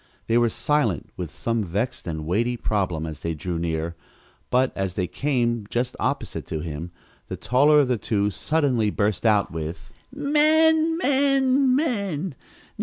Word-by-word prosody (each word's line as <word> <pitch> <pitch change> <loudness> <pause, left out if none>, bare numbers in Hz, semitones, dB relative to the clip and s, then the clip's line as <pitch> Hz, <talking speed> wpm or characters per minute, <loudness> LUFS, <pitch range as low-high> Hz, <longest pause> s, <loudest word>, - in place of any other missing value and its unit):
They 115 - 0
were 120 -1 +3
silent 120 - 0
with 90 -3 -5
some 115 +7 -2
vexed 100 +6 -3
and 80 -2 -4
weighty 115 +8 0
problem 90 -8 -1
as 80 -1 -7
they 85 -1 -3
drew 85 +2 -4
near, 85 0 -2 0.5
but, 130 +1 +2
as 95 -2 -2
they 90 - 0
came 120 -3 -1
just 125 +1 -2
opposite - - -2
to 80 -1 -3
him, 80 +1 -5 0.4
the - - -5
taller 140 +7 +4
of 140 - +1
the 125 -3 0
two 105 0 0
suddenly 130 - +1
burst 105 +2 0
out 105 -2 +3
with: 80 +4 -6 0.2
"Men, 315 +3 +3
men, 270 -3 +3
men! 200 - -1
115 Hz, 155 wpm, -24 LUFS, -, 0.5 s, taller